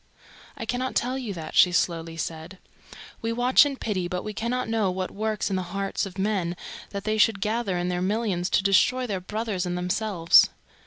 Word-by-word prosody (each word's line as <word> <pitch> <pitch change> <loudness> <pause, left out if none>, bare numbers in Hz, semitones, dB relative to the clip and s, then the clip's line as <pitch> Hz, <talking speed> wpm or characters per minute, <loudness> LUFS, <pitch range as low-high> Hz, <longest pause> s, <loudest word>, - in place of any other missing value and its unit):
"I 225 - -5
cannot 250 +3 -2
tell 250 +2 0
you 250 -5 -4
that," 160 -2 -7
she 180 - +6
slowly 165 -2 -1
said. 160 +4 -5 0.6
"We 225 - -1
watch 245 +4 +5
and 275 -2 -5
pity, 185 -5 -2
but 180 0 -3
we 215 - -5
cannot 240 +4 -2
know 225 -3 +1
what 185 0 -3
works 215 0 -2
in - - +1
the 185 - 0 0.2
hearts 195 0 -1
of 190 0 -12
men 190 -3 0 0.3
that 200 -1 -5
they 215 0 -1
should 215 -2 +4
gather 210 -2 -1
in 175 0 -1
their 180 0 -1
millions 195 -2 0
to 190 - -1
destroy 245 +6 +3
their 195 -6 -3
brothers 210 0 -3
and 175 0 -2
themselves. 180 -1 +4
200 Hz, 200 wpm, -25 LUFS, 180-225 Hz, 0.6 s, she